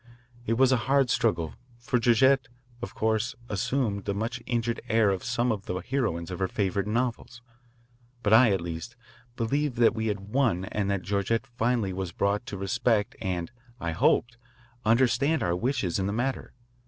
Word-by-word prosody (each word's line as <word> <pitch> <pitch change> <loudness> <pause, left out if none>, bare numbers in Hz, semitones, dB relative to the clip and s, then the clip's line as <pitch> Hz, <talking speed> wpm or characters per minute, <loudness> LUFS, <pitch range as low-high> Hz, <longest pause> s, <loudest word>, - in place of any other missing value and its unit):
It 115 - +2
was 130 +2 +4
a 130 - +4
hard 135 -3 +3
struggle, 95 -9 +1 0.2
for 120 +1 0
Georgette, 130 +3 +4 0.3
of 120 - -6
course, 110 +4 0
assumed 105 -1 -1
the 100 - -1
much 115 +3 -3
injured 120 -1 -1
air 110 -3 +4
of 95 -2 -3
some 120 0 0
of 100 -3 -4
the 90 - -2
heroines 90 -4 -2
of 90 - -5
her 95 - +1
favourite 100 0 -1
novels. 120 +1 -2 0.8
But 105 0 +3
I, 115 +1 +7
at 95 -3 +1
least, 85 +6 -6 0.4
believed 135 +4 -1
that 115 -1 +5
we 110 0 -2
had 105 -2 -2
won 115 -9 +1
and 100 0 -2
that 100 -2 -1
Georgette 100 +5 0
finally 120 -5 -1
was 95 -2 -4
brought 100 +6 0
to 100 - -5
respect 105 +2 0
and, 90 -1 -3 0.3
I 85 -4 -2
hoped, 120 +8 +2 0.5
understand 125 +5 +3
our 85 0 +1
wishes 110 -4 -1
in 95 - 0
the 100 - -2
matter. 125 +4 -2
110 Hz, 175 wpm, -27 LUFS, 95-120 Hz, 0.8 s, I